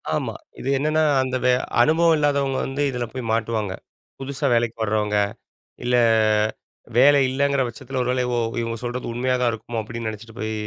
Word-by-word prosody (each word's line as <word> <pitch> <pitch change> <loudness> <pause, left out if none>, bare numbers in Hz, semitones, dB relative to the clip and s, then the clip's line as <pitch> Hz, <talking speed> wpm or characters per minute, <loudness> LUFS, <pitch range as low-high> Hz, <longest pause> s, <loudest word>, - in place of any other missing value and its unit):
ஆமா. - - -2 0.3
இது 135 - -4
என்னென்னா 155 +3 +1 0.2
அந்த 130 0 -2
வ - - +5 0.3
அனுபவம் 160 +4 +4
இல்லாதவங்க 140 -2 +1
வந்து 135 +2 -3
இதில 125 -1 -3
போய் 125 -3 -5
மாட்டுவாங்க. 110 -3 -1 0.5
புதுசா 135 +1 -4
வேலைக்கு 115 -1 +1
வர்றவுங்க 105 -1 0 0.7
இல்ல, 125 0 +1 1.0
வேலை 140 +3 +7
இல்லைங்கிற 140 +1 +1
பட்சத்தில 130 +2 -6
ஒரு 125 - -2
வேளை 125 -1 0
ஓ! - - +2 0.2
இவங்க 115 0 -3
சொல்றது 120 0 -4
உண்மையா 125 +2 0
தான் 120 -1 +3
இருக்குமோ 115 0 -4
அப்டின்னு 115 +1 -5
நினைச்சிட்டு 110 +1 -10
போய் 110 0 -2
125 Hz, 165 wpm, -23 LUFS, 115-135 Hz, 1.0 s, வேலை